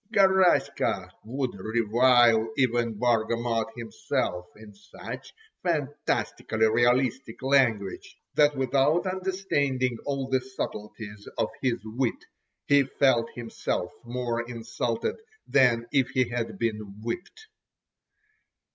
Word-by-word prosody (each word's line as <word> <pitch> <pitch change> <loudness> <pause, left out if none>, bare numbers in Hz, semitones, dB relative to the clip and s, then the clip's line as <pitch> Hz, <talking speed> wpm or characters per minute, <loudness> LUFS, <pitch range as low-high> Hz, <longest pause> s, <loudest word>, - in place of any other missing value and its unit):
Garaska 190 -2 +3
would 130 +2 -3
revile 115 +2 +3
even 120 -3 +1
Bargamot 115 0 +1
himself 90 -5 -2
in 105 -1 -13
such 105 +1 -9 0.3
fantastically 145 -8 -1
realistic 120 +2 +1
language, 125 -8 +1 0.2
that 145 -1 +4
without 140 +6 +2
understanding 165 -10 -1
all 135 -2 -1
the 130 -1 +1
subtleties 105 -5 -7
of - - +1
his 125 -3 +1
wit, 115 +3 -2 0.4
he 145 0 +5
felt 130 -3 +2
himself 115 -6 -3
more 120 -1 -2
insulted, 120 0 -3 0.3
than 120 -4 +3
if 135 -3 +2
he 130 -2 +1
had 120 -1 -3
been 115 -2 -1 0.2
whipped. 180 - -5
120 Hz, 100 wpm, -27 LUFS, 115-135 Hz, 0.4 s, he